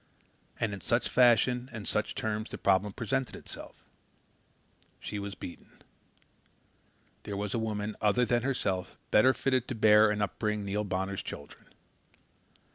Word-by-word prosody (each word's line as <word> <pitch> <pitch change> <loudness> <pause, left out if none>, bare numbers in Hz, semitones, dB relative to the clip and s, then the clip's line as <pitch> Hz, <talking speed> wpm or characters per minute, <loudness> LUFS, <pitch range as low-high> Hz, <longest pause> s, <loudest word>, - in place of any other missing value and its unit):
And 110 -3 0
in 100 - -6
such 120 +1 +1
fashion 125 +1 +4
and 110 -3 -6
such 105 0 0
terms 110 0 -2
the - - -6
problem 100 +1 +2
presented 135 +5 -2
itself. - - -11 1.2
She 105 - -5
was 100 0 -5
beaten. 85 - -11 1.4
There 100 - -5
was 100 0 -2
a 115 - 0
woman 105 -1 -2
other 105 +4 +3
than 120 0 +2
herself 100 -8 -2
better 120 +5 +6
fitted 130 -2 0
to 130 - -3
bear 105 0 +6
and 105 0 -1
upbring 105 +1 -2
Neil 100 +2 -1
Bonner's 95 0 -2
children. 70 - -9
105 Hz, 140 wpm, -30 LUFS, 100-120 Hz, 1.4 s, better